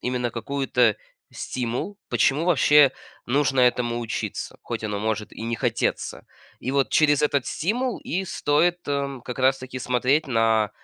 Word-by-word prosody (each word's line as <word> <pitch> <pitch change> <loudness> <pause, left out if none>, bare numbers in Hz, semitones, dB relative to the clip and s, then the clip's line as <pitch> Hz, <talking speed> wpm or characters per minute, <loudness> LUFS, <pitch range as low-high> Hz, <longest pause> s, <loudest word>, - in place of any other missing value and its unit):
именно 125 -1 -1
какую-то 125 -2 +1 0.4
стимул, 125 - -4
почему 145 +5 +2
вообще 150 -4 +5 0.4
нужно 135 0 +2
этому 120 -1 +2
учиться, 115 -2 -4
хоть - - -5
оно 105 -2 -2
может 110 0 -2
и - - -9
не 115 +1 -2
хотеться. - - -2 0.3
И 130 - -4
вот 140 -1 +2
через 145 -2 +3
этот 140 -3 +1
стимул 240 +9 -1
и 190 +2 -3
стоит, 175 0 +1
эм, 140 -2 -2
как 125 +1 -7
раз-таки, 130 0 0
смотреть 130 +5 +1
на 115 -3 +2
130 Hz, 145 wpm, -24 LUFS, 120-145 Hz, 0.4 s, вообще